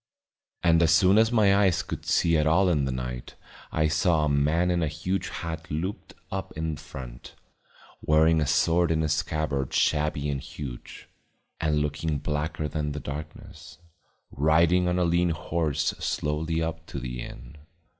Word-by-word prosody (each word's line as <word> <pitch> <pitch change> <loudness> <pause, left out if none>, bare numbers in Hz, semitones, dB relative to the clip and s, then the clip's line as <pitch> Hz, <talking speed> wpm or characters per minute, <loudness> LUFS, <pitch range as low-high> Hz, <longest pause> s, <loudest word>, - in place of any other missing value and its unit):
And 85 -1 +4
as 85 - +4
soon 90 +6 +5
as 110 +1 +3
my 105 -4 +4
eyes 100 -4 +3
could - - -7
see 85 -1 +3
at 75 -1 +2
all 90 +4 +4
in 75 -5 +1
the 65 - -2
night 60 -1 -5 0.4
I 80 0 +2
saw 80 0 +2
a - - 0
man 75 +5 +2
in 85 -1 +1
a 80 - +1
huge 80 +6 -3
hat 85 +1 -6
looped 90 +6 -4 0.2
up 95 0 -4
in 80 -1 -2
front, - - -10 0.7
wearing 80 +1 +4
a 75 - 0
sword 80 +3 +2
in 80 -1 +1
a - - +1
scabbard 75 -2 -1
shabby 75 -1 +1
and 70 -2 -2
huge, 65 -4 -9 0.5
and 75 -1 +1
looking 75 +1 -2
blacker 75 +2 -2
than 75 -1 -3
the 75 - -4
darkness, 75 0 -9 0.5
riding 85 +5 +3
on 90 0 +1
a 90 - +2
lean 85 +1 +2
horse 80 -2 -1
slowly 80 +2 -1
up 80 0 -5
to 70 - -5
the 60 -1 -5
inn. - - -10
80 Hz, 165 wpm, -26 LUFS, 75-85 Hz, 0.7 s, soon